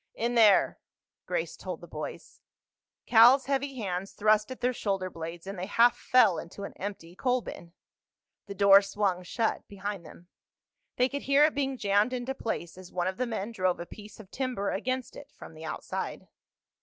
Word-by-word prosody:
"In 235 +1 -1
there," 220 -4 +5 0.5
Grace - - -2
told - - -6
the - - -12
boys. - - -8 0.6
Cal's 245 +4 +7
heavy 275 0 -1
hands 195 -4 -4
thrust 215 +1 +2
at 260 - -7
their 250 +1 +1
shoulder 195 -5 -2
blades 165 +1 -7
and 195 -1 -6
they 185 - -4
half 235 +3 +4
fell 230 -8 +4
into 195 +4 -9
an - - -6
empty 185 -3 -7
coalbin. 245 -8 -2 0.7
The 200 - -7
door 200 0 +7
swung 195 -2 -1
shut 225 +5 -2
behind 200 -2 -5
them. 170 +2 -14 0.7
They 250 - +3
could 280 +2 -4
hear 280 +2 +5
it 310 - +1
being 270 -2 -1
jammed 205 +2 +2
into 250 +1 -3
place 185 -8 -5
as 185 -1 -12
one 175 -1 -1
of 190 0 -2
the 255 - -1
men 220 -1 -4
drove 185 -5 0
a 170 - -5
piece 210 +4 -12
of 200 -3 -13
timber 255 -7 -2
against 255 +5 -3
it - - -12
from - - -11
the 160 +1 -10
outside. 155 - -5
205 Hz, 180 wpm, -28 LUFS, 185-250 Hz, 0.7 s, Cal's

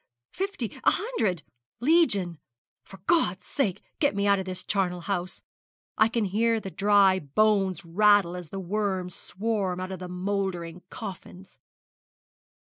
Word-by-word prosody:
fifty 395 +2 -3
a - - +6
hundred 220 - -1 0.4
legion. 220 - +2 0.4
For 195 - -13
God's 190 - +2
sake 215 -11 -1 0.2
get 285 -8 +2
me 200 0 0
out 200 -1 +4
of 190 - -4
this 185 -1 -5
charnel 180 -3 0
house! 180 0 -3 0.5
I 220 - +5
can 225 -2 0
hear 225 +4 +1
the 195 -3 -7
dry 200 -1 +4
bones 195 +4 +1
rattle 200 0 +4
as 180 -3 -7
the 195 - -5
worms 190 -1 -2
swarm 195 -2 -2
out 185 +1 -4
of 190 - -5
the 180 -1 -7
mouldering 180 -2 -3
coffins.' 190 -2 -9
195 Hz, 140 wpm, -27 LUFS, 180-215 Hz, 0.5 s, a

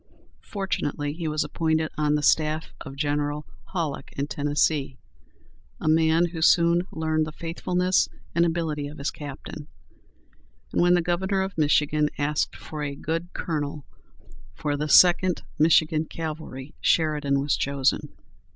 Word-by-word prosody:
Fortunately 145 -7 -2
he 165 0 -4
was 155 0 0
appointed 160 -1 0
on 150 -1 +1
the 150 - -1
staff 155 +1 +2
of 135 -3 -9
General 145 +1 -1 0.3
Halleck 160 -7 -3
in 140 - 0
Tennessee, 145 -2 0 0.8
a - - -4
man 160 +2 +4
who 165 -1 -6
soon 170 +2 +4
learned 155 -1 0
the - - -6
faithfulness 180 +3 0 0.2
and 170 - +3
ability 160 -4 -1
of 150 +2 -10
his 140 - -2
captain; 145 0 -8 1.1
and - - +2
when 175 0 +5
the 175 - +2
Governor 190 +3 0
of 190 +1 -5
Michigan 150 0 +2
asked 150 +1 0
for 155 -1 -7
a 140 -1 -3
good 165 +4 -3
colonel 145 -3 -3 0.7
for 145 - -2
the 150 +1 -3
Second 180 +2 +5 0.2
Michigan 155 0 +4
Cavalry, 155 -4 -6
Sheridan 150 -4 +2
was 140 +1 +1
chosen. 140 -1 0
155 Hz, 140 wpm, -25 LUFS, 145-165 Hz, 1.1 s, when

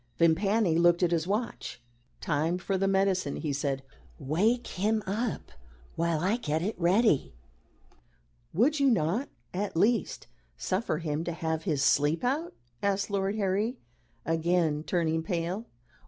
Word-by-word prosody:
Vimpany 175 +2 +3
looked 175 +1 +4
at 175 - +3
his 170 0 0
watch. 215 - -3 0.4
"Time 160 +3 0
for 190 +1 -2
the 195 +1 +1
medicine," 190 -5 +1
he 150 -3 -2
said. 135 -1 -2 0.3
"Wake 205 - +1
him 215 +3 0
up 215 +4 -3 0.4
while 170 -1 0
I 200 +6 +1
get 160 -7 -1
it 210 +4 -1
ready." 175 - +3 1.2
"Would 275 - +2
you 275 -1 +4
not 205 - +1 0.2
at 190 -1 -2
least 225 +3 +1 0.3
suffer 185 - -1
him 155 -1 -2
to 170 - -2
have 160 0 -3
his 150 -6 +1
sleep 145 +3 +3
out?" 285 +7 -1 0.3
asked 200 0 0
Lord 195 0 0
Harry, 210 +4 0 0.5
again 165 -1 +1
turning 160 -2 0
pale. 175 +6 -3
180 Hz, 140 wpm, -29 LUFS, 160-205 Hz, 1.2 s, looked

